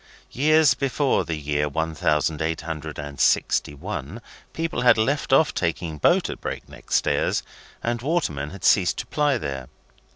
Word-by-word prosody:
Years 155 +1 +4
before 135 +2 0
the 80 - -2
year 75 0 -1
one 80 +2 -2
thousand 75 0 0
eight 80 +1 -1
hundred 80 -1 -6
and 75 -1 -7
sixty 75 - +2
one, 70 - -6 0.3
people 165 0 -2
had 125 - +6
left 135 +7 0
off 140 +3 +4
taking 85 -2 -2
boat - - +3
at - - -7
Break - - -5
Neck - - -15
Stairs, - - +1 0.4
and 120 0 -1
watermen 120 - -1
had 100 +2 -11
ceased 95 -3 +4
to - - -4
ply 145 -3 +1
there. 65 - -5
85 Hz, 165 wpm, -24 LUFS, -, 0.4 s, had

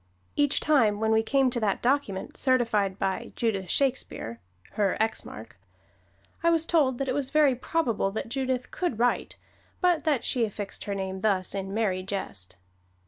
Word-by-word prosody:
Each 290 -1 +2
time 230 -9 +3
when 220 0 +1
we 220 0 +4
came 265 +3 +2
to 240 - -1
that 210 -4 0
document 245 -7 0
certified 230 -7 +2
to - - -23
by 195 +4 -1
Her - - -11
"Judith 220 -5 0
X - - -4
Shakespeare," 250 - -1 0.8
Mark - - -11 0.8
I 335 - +3
was 330 -1 +3
told 285 -7 +2
that 275 - -2
it 255 - 0
was 275 -1 -2
very 300 -3 +4
probable 250 -5 0
that 210 +3 -4
Judith 255 0 -2
could 350 - -2
write, 245 +1 0 0.4
but 355 -4 +2
that 290 -7 +2
she 245 - +1
affixed 205 -2 -4
her 200 - -2
name 190 -1 -4
thus 190 -2 +1
in 195 -1 -4
merry 200 -3 0
jest. 185 - -5
235 Hz, 175 wpm, -27 LUFS, 195-275 Hz, 0.8 s, we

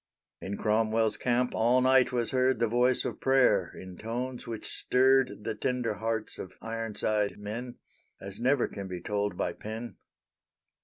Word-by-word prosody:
In 100 +1 -4
Cromwell's 110 0 +2
camp 125 +2 0
all 120 +3 +3
night 130 0 +4
was 120 -2 -1
heard 130 0 +2
The 115 - +2
voice 125 +3 +2
of - - -4
prayer 130 -9 +3
in 95 -1 -10
tones 125 +3 -4
which 115 -2 -5
stirred 130 -5 +2
The - - -2
tender 125 0 -1
hearts 110 +1 -3
of 95 - -7
"Ironside" 110 -2 -2
men, 115 +4 -6 0.4
As 100 0 -8
never 130 +2 +2
can 100 -1 -7
be 90 -1 -5
told 100 0 -2
by - - -1
pen. 110 +2 -7
115 Hz, 155 wpm, -29 LUFS, 105-125 Hz, 0.4 s, night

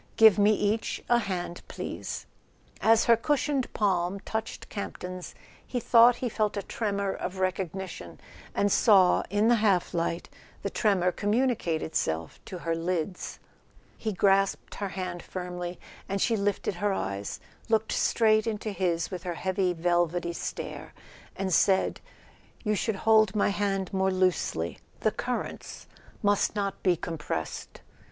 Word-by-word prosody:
Give 220 -2 +7
me 205 +1 +6
each 210 +2 -1
a 240 - +6
hand, 180 -5 -4
please." - - -5 0.6
As 225 +1 +5
her 235 - +6
cushioned 280 +2 0
palm 190 -2 0
touched 220 +1 -4
Camp 200 - -5
ton's 180 0 -7 0.3
he 250 - -3
thought 235 +1 +6
he - - +2
felt 215 -2 -1
a 200 - -2
tremor 200 -2 -2
of 185 +1 -5
recognition, 185 0 -3 0.4
and 200 0 +2
saw, 190 -5 +5
in 205 +3 +2
the 240 0 +5
half 200 -5 +2
light, 170 0 -1 0.4
the - - -2
tremor 190 -5 +2
communicate 205 -6 0
itself 80 - -2
to 185 - -6
her 165 -1 -2
lids. 175 +2 -3 0.6
He 220 - -3
grasped 195 0 +2
her 200 -1 -4
hand 185 -2 -4
firmly, 180 -1 -5 0.3
and 195 +1 -1
she 230 - +2
lifted 200 -1 0
her 205 -1 +2
eyes, 100 - -3 0.3
looked 220 -1 +2
straight 220 -1 +3
into 215 -1 -2
his 175 -3 -1
with 180 -2 -4
her 175 -1 -4
heavy 185 +1 0
velvety 175 0 0
stare, - - -6 0.4
and 190 -2 -2
said: 190 +4 +3 0.6
"You 215 -2 +1
should 215 +1 0
hold 220 -2 +5
my 205 - +3
hand 195 -2 -1
more 190 0 +2
loosely; 185 - 0 0.2
the - - +3
currents - - -4 0.4
must 205 +1 +2
not 200 -2 -2
be 180 -2 +3
compressed." 155 - -5
195 Hz, 145 wpm, -28 LUFS, 180-215 Hz, 0.6 s, Give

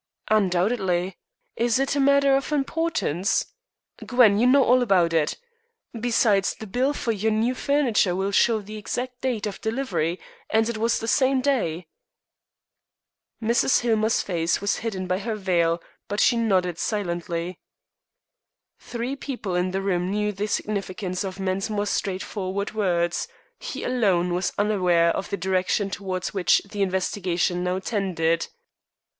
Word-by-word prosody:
"Undoubtedly. 190 -2 +1 0.4
Is 235 0 +2
it 270 +1 0
a - - +1
matter 280 0 +4
of 275 +2 -1
importance? 290 - 0 0.6
Gwen, 230 -5 +4
you 245 - +4
know 270 +1 +6
all 250 +1 +4
about 180 -8 +3
it. 155 -2 +1 0.6
Besides, 225 -4 +2
the 220 - -9
bills 255 +8 0
for 235 - -1
your 220 +1 0
new 225 +4 +1
furniture 255 -10 +1
will 195 +2 -1
show 220 +2 +3
the 210 +2 -9
exact 245 +4 -4
date 245 -6 -1
of 210 - -5
delivery, 220 - -1 0.3
and 220 0 +2
it 235 -2 -3
was 230 +1 +2
the 225 - -5
same 265 +2 +3
day." 220 - 0 1.6
Mrs. 235 +3 +3
Hillmer's 220 -2 +1
face 170 -3 0
was 200 +1 0
hidden 200 -5 -4
by 185 +1 -1
her 220 +1 -3
veil, 175 -4 +1 0.3
but 205 - -3
she 245 - +4
nodded 185 -7 +1
silently. 175 -3 -3 1.2
Three 245 +3 -4
people 255 -9 -5
in 180 +1 +1
the 195 +1 -2
room 180 -2 0
knew 210 +1 0
the 205 +1 -3
significance 195 -3 -3
of 190 0 -6
Mensmore's 195 +2 -1
straightforward 195 +1 -3
words; 175 -5 0 0.3
he - - -6
alone 190 -8 +1
was 180 +2 0
unaware 180 -5 +2
of 195 - -4
the 200 - -2
direction 190 +2 0
towards 185 -1 -4
which 180 -6 +3
the 205 - -3
investigation 185 -2 0
now 180 +1 0
tended. 185 -5 -1
200 Hz, 145 wpm, -24 LUFS, 185-235 Hz, 1.6 s, know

